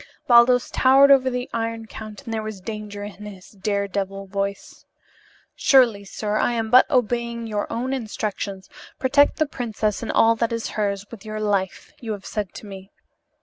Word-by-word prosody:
Baldos 245 0 +5
towered 270 +2 +6
over 260 -1 +5
the 250 0 -3
Iron 230 0 -3
Count 215 0 -10
and 230 - -5
there 220 - -1
was 215 -2 -6
danger 210 0 -7
in 210 0 -9
his 190 -3 -12
dare 200 0 -2
devil 195 0 -4
voice. 200 +1 -5 0.7
"Surely, 240 -7 +4
sir, 210 +1 -3
I 240 - +1
am 225 -1 -2
but 255 +1 +7
obeying 235 -2 0
your 210 -2 -3
own 250 +3 -2
instructions. 210 -5 -4 0.3
'Protect 285 +2 +3
the 310 - +2
princess 225 -6 -3
and 230 - -3
all 230 0 +4
that 230 +1 0
is 230 -1 -3
hers, 200 -1 -2
with 225 -3 -10
your 215 -1 -5
life,' 200 -3 -2
you 225 -3 -4
have 200 -2 -9
said 205 -5 -4
to - - -9
me." 195 -1 -10
220 Hz, 180 wpm, -23 LUFS, 205-235 Hz, 0.7 s, but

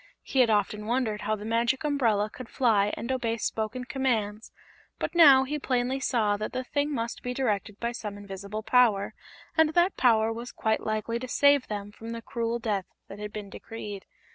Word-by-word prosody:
He 270 - -1
had 245 -3 +5
often 210 0 0
wondered 230 -3 0
how 215 - 0
the 210 0 -8
Magic 230 +4 +1
Umbrella 235 -9 +2
could 230 +3 -10
fly 210 -5 +2
and 235 +4 -3
obey 235 -3 -1
spoken 220 +3 -2
commands, 230 -5 -1 0.5
but - - -3
now 285 -6 +8
he 295 +3 -3
plainly 255 0 0
saw 220 -6 +1
that 215 - -4
the 255 - -2
thing 285 +3 -1
must 235 -3 -3
be 250 0 -4
directed 210 -5 -1
by 235 0 -1
some 210 -3 -6
invisible 200 +1 -6
power, 225 -5 +3 0.4
and 320 -1 +3
that 350 +2 +3
power 225 -2 +4
was 235 +2 -7
quite 220 0 0
likely 215 +2 -2
to 255 - -6
save 285 +1 +4
them 205 -1 -5
from 225 +2 -8
the 230 - -6
cruel 230 0 -2
death 210 -5 -2 0.2
that 200 - -9
had 210 0 -5
been 205 -2 -7
decreed. 210 -3 -8
230 Hz, 190 wpm, -28 LUFS, 210-255 Hz, 0.5 s, now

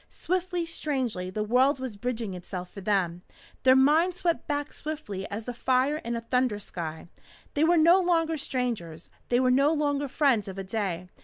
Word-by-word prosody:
Swiftly, 360 -1 -2
strangely, 260 - -2
the 210 +3 -2
world 255 +5 +3
was 255 -5 -5
bridging 225 -2 -3
itself 180 0 -7
for 200 - -9
them. 185 -4 0 0.4
Their 260 0 +6
minds 315 +7 +4
swept 340 -2 0
back 290 -1 -2
swiftly 250 -12 -5
as 215 +2 -5
the 245 - -4
fire 260 +4 +1
in 235 -5 -4
a 230 - -3
thunder 250 -2 0
sky. 165 -6 -6 0.5
They 295 - +2
were 340 +2 +4
no 335 +4 +6
longer 330 -2 +2
strangers. 235 - -3 0.2
They 245 - +3
were 255 -1 +3
no 275 +4 +4
longer 290 -2 0
friends 260 -7 +2
of 190 0 -7
a 195 - -3
day. 185 -3 -3
255 Hz, 180 wpm, -27 LUFS, 200-300 Hz, 0.5 s, Their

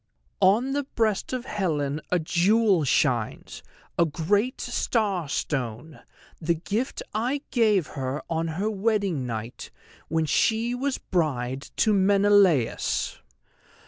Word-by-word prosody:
"_On 220 +8 +3
the 285 -1 -1
breast 215 -3 0
of 255 -1 -3
Helen 155 - -1
a 180 - +2
jewel 180 +3 +3
shines, 125 -5 0 0.4
a 170 - +6
great 205 - 0
star 205 - -1
stone, 135 0 -3 0.4
the 170 +1 +1
gift 210 - -3
I 255 +6 -1
gave 215 - +3
her 135 +1 -4
on 165 0 -1
her 205 +3 0
wedding 200 - 0
night 115 0 -6 0.4
when 160 -1 0
she 225 - +1
was 265 +2 -1
bride 135 -6 -2
to 215 - +3
Menelaus. 195 - +3
185 Hz, 115 wpm, -25 LUFS, 150-220 Hz, 0.4 s, a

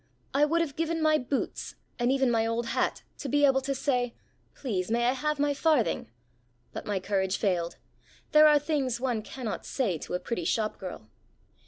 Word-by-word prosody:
I 290 +2 +5
would 335 +3 +2
have 290 -4 -2
given 330 0 -1
my 310 -1 +4
boots, 255 +2 -3 0.2
and 240 +1 +2
even 265 -2 +2
my 225 -1 +2
old 230 +1 -1
hat, - - -1 0.2
to 280 - -4
be 290 +2 +4
able 270 -1 +4
to 275 +1 -2
say, 250 -3 0 0.4
"Please, 195 -9 -2
may 235 +1 +2
I - - +4
have 300 +3 -1
my 290 0 +2
farthing?" 285 - +1 0.6
But - - -6
my 205 -2 0
courage 190 0 0
failed. 175 -4 0 0.5
There 305 0 +8
are 300 -1 +6
things 280 -5 -1
one 245 -4 -1
cannot 230 0 -5
say 200 - -1
to - - -4
a - - -1
pretty 230 -5 -3
shop 215 +4 0
girl. 180 - -7
255 Hz, 190 wpm, -28 LUFS, 215-290 Hz, 0.6 s, There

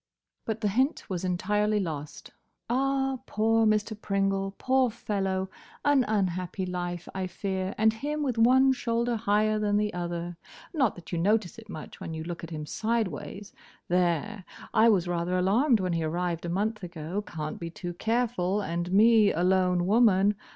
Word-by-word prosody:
But 220 0 -3
the 210 - +1
hint 260 +9 0
was 180 -1 -2
entirely 210 +4 +1
lost. 155 -6 -5 0.4
"Ah, 270 +1 +1
poor 225 +1 +2
Mr. 215 +1 +1
Pringle! 195 -1 -1
Poor 260 -1 +2
fellow! 195 -4 -2 0.4
An 285 -3 +4
unhappy 185 -2 -1
life, 175 -1 -4
I 190 -1 -2
fear; 190 +1 -3
and 220 0 +4
him 295 +6 -3
with 250 -5 -1
one 260 +3 +6
shoulder 235 -1 0
higher 215 0 +1
than 205 -1 +1
the 210 0 0
other. 175 -1 -4 0.4
Not 265 - +2
that 175 -2 -12
you 170 - -1
notice 205 +2 +1
it 220 -2 -15
much 155 - -9
when 160 - -5
you 160 - -5
look 170 0 -6
at 165 - -6
him 155 -2 -5
sideways. 205 0 -3 0.4
There. 180 +3 0 0.3
I 225 +1 +6
was 185 -5 +2
rather 175 +1 -1
alarmed 220 +7 +3
when 185 -2 -1
he 165 -1 0
arrived 170 +1 -2
a - - -3
month 210 +5 -1
ago. 175 +2 -4
Can't 155 -6 -6
be 170 - -5
too 175 +1 -6
careful, 220 -2 0
and 175 -2 -3
me 215 +1 +6
a 170 - -1
lone 180 -1 +2
woman. 205 -1 +4
195 Hz, 170 wpm, -28 LUFS, 175-225 Hz, 0.4 s, one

